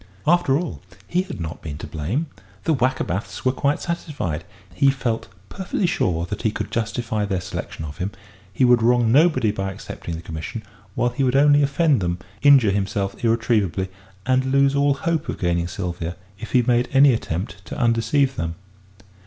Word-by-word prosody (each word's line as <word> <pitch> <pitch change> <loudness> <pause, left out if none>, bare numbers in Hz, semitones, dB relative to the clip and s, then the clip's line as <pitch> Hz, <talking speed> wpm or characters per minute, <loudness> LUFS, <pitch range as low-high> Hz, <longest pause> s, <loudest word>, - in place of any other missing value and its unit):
After 160 -4 +3
all, 145 - -4 0.3
he 180 - +1
had 185 - -7
not 85 -1 -5
been 75 -3 -6
to - - -7
blame; 90 - -2 0.4
the 160 - +2
Wackerbaths 125 - -1
were 130 - +4
quite 140 +2 0
satisfied. 145 - -3 0.3
He 135 +9 +4
felt 125 -4 -1 0.2
perfectly 190 - -2
sure 85 - 0
that 105 +3 -5
he 110 - +2
could 105 0 -5
justify 110 -1 -1
their 100 -3 -1
selection 90 -3 -6
of 75 0 -9
him; 90 - -1 0.4
he 125 +7 +2
would 120 -1 +5
wrong 120 0 +3
nobody 130 -6 +4
by 95 -2 -3
accepting 85 -2 -7
the 85 - -8
commission, 80 +9 -6 0.3
while 120 - +2
he 130 +3 -1
would 130 0 +2
only 145 +1 +6
offend 145 - +2
them, 85 -1 -1 0.2
injure 135 -8 +6
himself 100 +1 -2
irretrievably, 110 -6 +1 0.4
and 130 +1 +2
lose 140 +1 +3
all 140 0 +3
hope 165 +2 -1
of - - -3
gaining 85 -1 0
Sylvia 85 -1 -4 0.2
if 115 0 -8
he 125 - +5
made 120 +1 +2
any 135 0 +6
attempt 95 -2 -4
to - - -7
undeceive 120 +3 +2
them. 85 0 -2
115 Hz, 180 wpm, -22 LUFS, 95-140 Hz, 0.4 s, only